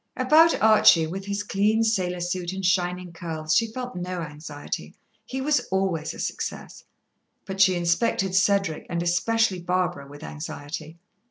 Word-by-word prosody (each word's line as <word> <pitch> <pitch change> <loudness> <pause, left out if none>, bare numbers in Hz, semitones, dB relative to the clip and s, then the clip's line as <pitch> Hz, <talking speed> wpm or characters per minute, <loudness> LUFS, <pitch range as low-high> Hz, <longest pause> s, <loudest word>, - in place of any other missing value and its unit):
About 310 +6 +5
Archie, 215 -7 +6
with 190 +4 -6
his 200 +1 -2
clean 210 +2 +1
sailor 185 -5 0
suit 175 0 -3
and 190 0 -4
shining 180 -1 0
curls, 160 -2 -3
she 230 - +3
felt 250 0 -6
no 180 0 -4
anxiety. 150 -1 -7 0.3
He 265 0 -4
was 295 +2 +2
always 190 -5 -1
a - - -11
success. - - -5 0.6
But 195 0 -3
she 190 -1 +5
inspected 180 +3 +1
Cedric, 195 -4 +1
and 170 0 -1
especially 195 +3 +1
Barbara, 175 -5 -1
with 145 +2 -12
anxiety. 155 +1 -7
180 Hz, 150 wpm, -25 LUFS, 170-200 Hz, 0.6 s, Archie